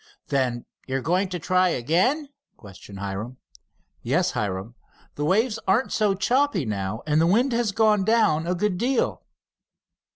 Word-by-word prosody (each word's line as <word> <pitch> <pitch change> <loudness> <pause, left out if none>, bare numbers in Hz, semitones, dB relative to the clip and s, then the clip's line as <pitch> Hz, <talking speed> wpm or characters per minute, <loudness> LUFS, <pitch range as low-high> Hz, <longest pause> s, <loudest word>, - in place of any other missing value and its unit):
"Then 130 -4 -1 0.2
you 135 0 -1
are - - -3
going 185 +6 0
to 180 - -3
try 185 +2 +2
again?" 185 - +1 0.3
questioned 100 -1 -12
Hiram. 100 +6 -5 0.6
"Yes, - - +1
Hiram. 100 +2 -3 0.4
The 145 - -4
waves 220 +6 +1
aren't 215 +8 +2
so 210 -3 +2
choppy 240 - +1
now, 100 0 -3
and 155 +1 +2
the 165 - +3
wind 240 +9 +3
has 230 -3 +1
gone 210 -1 +3
down 185 -8 +2
a 180 - 0
good 185 0 -1
deal." 250 +1 0
180 Hz, 155 wpm, -24 LUFS, -, 0.6 s, the